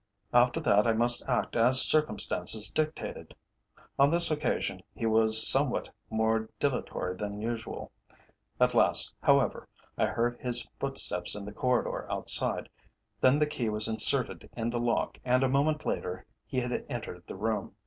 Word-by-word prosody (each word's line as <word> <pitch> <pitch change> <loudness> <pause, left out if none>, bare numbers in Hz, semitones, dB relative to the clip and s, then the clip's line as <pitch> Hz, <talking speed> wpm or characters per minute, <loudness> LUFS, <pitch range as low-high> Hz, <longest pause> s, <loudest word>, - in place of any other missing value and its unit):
After 120 0 +3
that 105 0 +2
I 115 - +2
must 120 +2 +2
act 125 - -2
as 125 +3 +4
circumstances 110 - +4
dictated. 155 0 -5 0.6
On 140 +1 +5
this 170 +1 +5
occasion 150 -1 -3
he 115 - -5
was 110 0 +4
somewhat 135 -1 +3 0.2
more 110 0 -1
dilatory 125 -9 -3
than 105 +1 -6
usual. 115 +1 -6 0.7
At - - +2
last, - - +1
however, - - +1 0.3
I - - +2
heard 120 +1 -3
his 120 -1 +3
footsteps 135 -10 0
in 105 -1 -8
the 105 - -8
corridor 125 +2 -2
outside, - - +2 0.5
then 130 +2 +3
the 150 - +1
key 150 -7 -4
was 105 +1 +1
inserted 110 0 +1
in 115 +1 -3
the 120 - -3
lock, 120 0 -2
and 130 +1 +1
a - - +2
moment 145 +3 -1
later 90 +1 -5 0.2
he 130 - -3
had 125 0 -4
entered 110 -9 -8
the - - -8
room. 110 -2 -4
120 Hz, 155 wpm, -28 LUFS, 110-130 Hz, 0.7 s, On